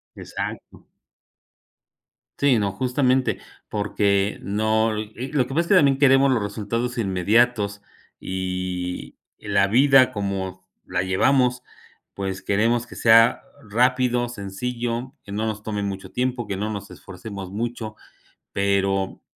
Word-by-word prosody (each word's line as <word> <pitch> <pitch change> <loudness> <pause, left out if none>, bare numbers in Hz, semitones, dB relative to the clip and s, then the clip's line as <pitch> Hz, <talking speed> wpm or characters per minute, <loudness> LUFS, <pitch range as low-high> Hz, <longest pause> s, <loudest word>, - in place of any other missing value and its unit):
Exacto. - - -7 1.5
Sí, 135 -5 +4
no, 100 -1 -1
justamente. 130 +3 +1 0.3
Porque 100 -1 0
no 110 +2 +1
e 110 +5 -6
lo 140 -4 +2
que 135 - -6
pasa 165 - +3
es 170 - -5
que 200 - +4
también 140 -6 +5
queremos 135 0 +5
los 115 -5 +1
resultados 115 +4 -3
inmediatos, 100 +1 +1 0.4
y 90 -1 -4 0.2
la 100 -2 +1
vida 130 +3 +5
como 95 -2 -4 0.2
la 90 0 -1
llevamos, 125 +6 +2 0.5
pues 95 -1 -4
queremos 115 +4 +1
que - - -12
sea 115 +1 +5 0.3
rápido, 125 +1 +2
sencillo, 120 +4 -4
que 100 - -11
no 110 +2 -2
nos 105 -1 -4
tome 105 -2 -3
mucho 95 -1 -5
tiempo, 125 0 -1
que 100 -2 -4
no 105 +2 -2
nos 100 -1 -6
esforcemos 95 0 -9
mucho, 110 0 -4 0.6
pero 100 -1 0
110 Hz, 125 wpm, -23 LUFS, 100-125 Hz, 1.5 s, también